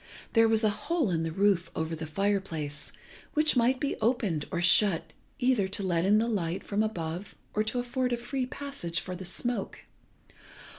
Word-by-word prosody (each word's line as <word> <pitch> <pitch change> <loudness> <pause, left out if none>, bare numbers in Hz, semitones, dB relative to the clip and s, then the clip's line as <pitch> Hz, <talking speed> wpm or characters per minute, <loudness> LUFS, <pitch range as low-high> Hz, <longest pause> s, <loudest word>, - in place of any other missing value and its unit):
There 225 -1 +6
was 225 0 +3
a 215 - +4
hole 305 - -1
in 165 -2 0
the 165 0 -2
roof 190 -1 +2
over 160 +1 -2
the 160 0 -6
fire 200 +5 +1
place 150 -6 -5 0.4
which 305 -1 +4
might 250 +2 +3
be 285 - -1
opened 215 - 0
or 175 - -2
shut 180 0 +3 0.2
either 250 -7 +2
to 195 +1 -2
let 175 -2 +1
in 205 +2 +5
the 225 +2 +2
light 185 -6 -1
from 205 +1 0
above 175 -3 -3 0.2
or 215 - +2
to 220 - -1
afford 250 +1 -1
a 240 - +1
free 255 +1 -3
passage 275 -12 -4
for 185 - -6
the 185 +1 -7
smoke. 220 +3 -1
205 Hz, 190 wpm, -29 LUFS, 170-240 Hz, 0.4 s, There